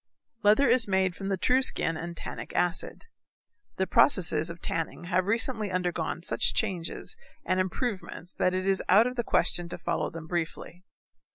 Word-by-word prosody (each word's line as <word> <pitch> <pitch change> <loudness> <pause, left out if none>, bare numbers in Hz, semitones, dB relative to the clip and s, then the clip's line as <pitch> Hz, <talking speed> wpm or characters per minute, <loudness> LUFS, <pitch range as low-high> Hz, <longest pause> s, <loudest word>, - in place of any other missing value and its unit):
Leather 215 +7 +5
is 235 -1 +4
made 190 -2 +1
from 195 0 -5
the 195 - 0
true 255 +7 +3
skin 165 -9 +1
and 170 +1 -6
tannic - - -7
acid. 175 -1 -1 0.7
The 190 - 0
processes 180 - +3
of 170 0 -8
tanning 165 +1 -4
have 180 +2 0
recently 225 -1 0
undergone 175 -2 -2
such - - +2
changes 190 - -2 0.3
and 185 - +1
improvements 185 -2 -3
that 185 0 0
it 185 0 -2
is 195 -1 +1
out 205 +5 +6
of 250 0 -3
the 240 - -1
question 175 -5 +1
to - - -6
follow - - -2
them 165 -1 -9
briefly. 170 +1 -4
185 Hz, 170 wpm, -28 LUFS, 170-210 Hz, 0.7 s, out